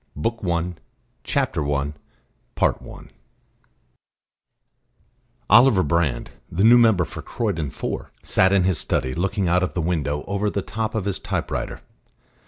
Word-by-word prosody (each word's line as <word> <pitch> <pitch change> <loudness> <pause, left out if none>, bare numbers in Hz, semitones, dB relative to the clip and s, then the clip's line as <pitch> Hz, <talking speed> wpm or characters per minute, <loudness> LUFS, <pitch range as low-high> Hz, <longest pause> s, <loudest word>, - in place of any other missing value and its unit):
BOOK 115 +10 -2
I 95 - -4
THE 85 - +2
ADVENT 85 0 -4 0.5
CHAPTER 75 -1 0
I 70 +2 -2 0.7
I - - -1 2.5
Oliver 120 -5 +6
Brand, 75 -5 0 0.2
the 90 +4 0
new 120 +2 +8
member 110 -7 +4
for 80 0 -8
Croydon 95 - -2
(4), - - -5
sat 95 0 +3
in 100 -2 +4
his 90 -3 +1
study, 65 - -1
looking 95 +3 -1
out 90 +2 +3
of 90 - -2
the - - 0
window 75 -4 -1
over 100 +1 -1
the 100 -1 -3
top 110 +1 -3
of 105 -4 -1
his 100 -2 -2
typewriter. - - -3
90 Hz, 145 wpm, -23 LUFS, 80-105 Hz, 2.5 s, new